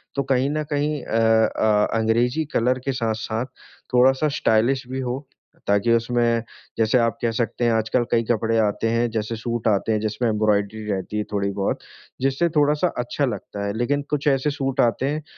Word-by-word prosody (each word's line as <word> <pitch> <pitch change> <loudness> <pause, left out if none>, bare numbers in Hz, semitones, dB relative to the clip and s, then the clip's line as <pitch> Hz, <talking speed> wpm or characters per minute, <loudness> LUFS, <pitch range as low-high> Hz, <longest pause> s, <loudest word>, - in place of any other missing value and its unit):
तो 140 - 0
कहीं 135 0 +1
न 155 0 -1
कहीं 145 0 0
अ 115 - -1 0.4
अ, 105 -1 +3
अंग्रेजी 120 +7 +1
कलर 125 +2 +2
के 135 - +1
साथ-साथ, 115 -1 -2 0.5
थोड़ा-सा 130 +4 +4
स्टाइलिश 120 +4 +2
भी 130 - -3
हो, 130 +2 -4 0.4
ताकि 100 +3 +3
उसमें, 115 0 +1 0.3
जैसे 110 +2 +3
आप 115 -1 +1
कह 115 -1 +1
सकते 120 +1 -1
हैं 120 - +3
आज-कल 110 +2 +1
कई 115 -1 +3
कपड़े 115 0 +1
आते 110 +1 +1
हैं 115 +1 +1
जैसे 110 +1 -2
सूट 115 0 -3
आते 105 +1 +1
हैं 110 - +1
जिसमे 110 +3 -1
एम्ब्रॉयडरी 105 0 0
रहती 95 +2 -3
है 105 - 0
थोड़ी-बहुत 100 -1 -1 0.4
जिससे 135 +6 +1
थोड़ा-सा 150 +3 +3
अच्छा 125 +4 -1
लगता 100 -3 -5
है, 100 - -2
लेकिन 145 +5 0
कुछ 150 0 -1
ऐसे 135 +1 +2
सूट 135 -1 -3
आते 120 +2 +1
हैं 150 +2 -2
115 Hz, 180 wpm, -23 LUFS, 110-135 Hz, 0.5 s, थोड़ा-सा